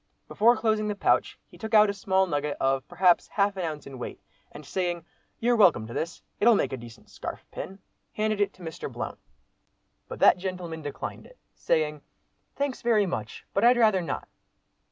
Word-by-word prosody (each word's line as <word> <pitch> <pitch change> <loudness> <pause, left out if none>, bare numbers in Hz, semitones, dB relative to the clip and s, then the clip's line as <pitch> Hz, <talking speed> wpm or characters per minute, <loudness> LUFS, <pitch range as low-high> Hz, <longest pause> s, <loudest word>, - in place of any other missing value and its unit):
Before 235 +3 +4
closing 215 -1 +1
the 210 - -1
pouch, - - +1
he - - -18
took 220 0 -1
out 210 0 +8
a - - -6
small 190 -1 +2
nugget 145 -4 -2
of, 135 0 +1
perhaps, 175 0 +3
half 200 -1 +1
an 185 - -3
ounce 155 -3 -4
in 135 -2 -9
weight, - - -6 0.3
and 150 - -11
saying, 175 +1 -2 0.3
"You're 240 +1 +3
welcome 175 - +5
to 115 - -8
this. 165 +6 -4 0.2
It'll 230 +1 +6
make 195 - 0
a - - -2
decent 115 -1 -13
scarf - - -7
pin," 195 - -7 0.4
handed 215 -1 0
it 205 - +2
to 185 - -15
Mr. 160 -1 -6
Blount. - - -5 0.9
But - - -7
that - - +6
gentleman 180 -3 -5
declined 145 -2 -6
it, - - -19 0.2
saying, 150 -2 0 0.5
"Thanks, 280 -2 -2
very 225 -3 +3
much, 115 - -5
but 200 - +1
I'd 245 +1 +6
rather 215 -5 +4
not." 170 - -4
185 Hz, 190 wpm, -27 LUFS, 155-215 Hz, 0.9 s, out